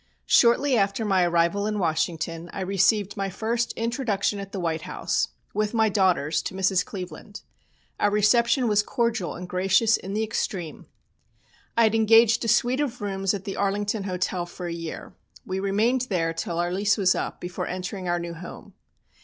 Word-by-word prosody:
Shortly 255 +3 +4
after 200 +1 +1
my 190 -3 +3
arrival 170 +4 +1
in 210 0 -2
Washington 165 -1 -2
I - - -4
received 200 +2 +1
my 195 -1 -2
first 230 +5 -1
introduction 225 -4 -1
at 195 0 -7
the 195 - -4
White 165 -2 -1
House, - - -1 0.3
with 215 +2 -1
my 220 -1 +3
daughters, 180 -7 +2
to 190 - -6
Mrs. 190 -1 +2
Cleveland. 185 +1 -8 0.6
Our 205 - +3
reception 235 +5 +3
was 210 -1 +3
cordial 220 -4 -1
and 180 +1 -7
gracious 195 +5 +3
in 195 - -7
the 215 +1 0
extreme. 190 -6 -4 0.9
I 230 - +6
had 220 -1 +3
engaged 225 +1 +5
a - - -2
suite 240 +3 +2
of 250 -4 -3
rooms 195 -1 -1
at 195 - -6
the 195 - -5
Arlington 205 +1 -1
Hotel 180 -1 -2
for 180 +1 -8
a 170 - -3
year. 165 -1 -7 0.3
We 185 +1 -3
remained 225 +6 +1
there 165 -4 0
till 165 +1 -4
our 175 0 0
lease 200 +4 +1
was 190 -2 +3
up - - -4
before 175 0 -5
entering 185 +1 -5
our 175 0 +1
new 170 0 -5
home. 170 +2 -10
195 Hz, 180 wpm, -25 LUFS, 180-220 Hz, 0.9 s, I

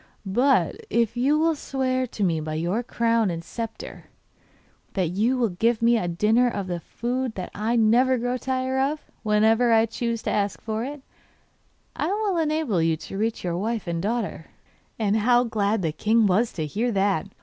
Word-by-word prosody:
But 250 +8 +2
if 235 -1 +1
you 270 +5 +2
will 325 +1 +3
swear 260 -3 -1
to 215 - -4
me 170 -4 +1
by 155 0 -4
your 175 +8 -1
crown 230 -3 +1
and 165 -1 -4
sceptre 225 +4 -7 0.9
that 185 -4 0
you 220 +9 +1
will 235 -3 +1
give 225 +6 +1
me 235 +1 +4
a 220 -6 0
dinner 215 +8 +2
of 200 -4 -3
the 175 -2 -3
food 245 +5 -3
that 185 -2 -5
I 220 +3 -1
never 240 +3 +4
grow 245 +1 -1
tired 260 0 -1
of, 290 +3 -1 0.2
whenever 220 +2 +3
I 225 0 +5
choose 230 0 -3
to - - -1
ask 200 -1 -1
for 220 0 -3
it, 280 +1 -6 0.9
I - - -1
will 405 -1 0
enable 305 - 0
you 160 -1 +1
to 195 - -8
reach 225 +1 -1
your 175 -1 -2
wife 225 +1 -2
and 170 -1 -2
daughter.' 205 -6 -3 0.5
Ah, 210 -3 +1
how 240 +3 +4
glad 215 -3 0
the 160 - 0
king 220 +8 +2
was 205 +5 +2
to 160 - -3
hear 220 +11 -1
that! 195 -3 +1
225 Hz, 185 wpm, -24 LUFS, 195-250 Hz, 0.9 s, I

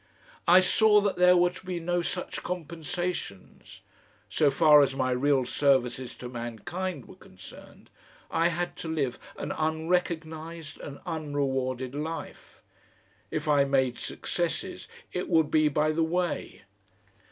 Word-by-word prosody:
I 180 +2 +8
saw 210 +3 +5
that 200 -1 0
there 180 0 +6
were 175 0 +4
to 180 - -13
be 180 -2 -3
no 175 +1 0
such 180 +1 -4
compensations. 170 - -5 0.5
So 150 - +3
far 150 +2 +6
as 135 -1 +1
my 130 -1 0
real 135 +1 +2
services 130 -2 +1
to 125 - -8
mankind 125 - -5
were - - -13
concerned - - -15 0.4
I 165 - +3
had 175 +1 -2
to - - -6
live 145 -6 -1 0.2
an - - -4
unrecognised 160 0 -2
and 140 -1 -8
unrewarded 135 -4 -2
life. 155 +3 -6 0.7
If 155 0 -3
I 145 -2 +5
made 130 -3 +1
successes - - -3 0.3
it - - -3
would 160 -2 +3
be 155 -1 +4
by 150 +1 +2
the 165 +1 +1
way. 175 +1 -2
155 Hz, 135 wpm, -28 LUFS, 135-175 Hz, 0.7 s, I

